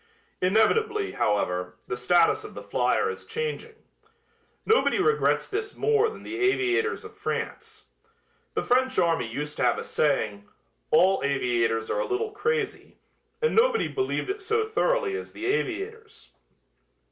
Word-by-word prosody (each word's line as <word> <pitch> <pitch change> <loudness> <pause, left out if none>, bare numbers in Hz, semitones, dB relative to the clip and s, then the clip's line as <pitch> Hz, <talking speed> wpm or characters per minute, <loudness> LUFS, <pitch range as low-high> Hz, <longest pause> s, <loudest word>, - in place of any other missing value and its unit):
Inevitably, 400 - +2
however, 90 -3 -1
the 125 - -3
status 170 - +3
of 425 - -10
the - - -7
flier 445 - +1
is - - -9
changing. 460 0 -4 0.9
Nobody 445 +2 +3
regrets 440 +3 +2
this 420 +1 -4
more 445 0 +3
than 440 - -11
the 350 - -6
aviators 395 +4 +1
of 430 0 -11
France. 435 +1 -5 0.7
The - - 0
French 260 +1 +2
army 165 -10 +1
used 150 +4 -5
to - - 0
have - - +3
a - - -4
saying, 110 -9 -1 0.4
"all 190 - +4
aviators 120 -5 0
are - - 0
a - - -1
little 420 +3 -1
crazy," 435 +1 -2 0.5
and 465 - +2
nobody 460 0 +3
believed 390 0 -2
it 405 +1 -6
so 440 +3 0
thoroughly 465 -1 0
as 425 - -7
the 340 - -6
aviators. 440 +3 -3
395 Hz, 145 wpm, -26 LUFS, -, 0.9 s, all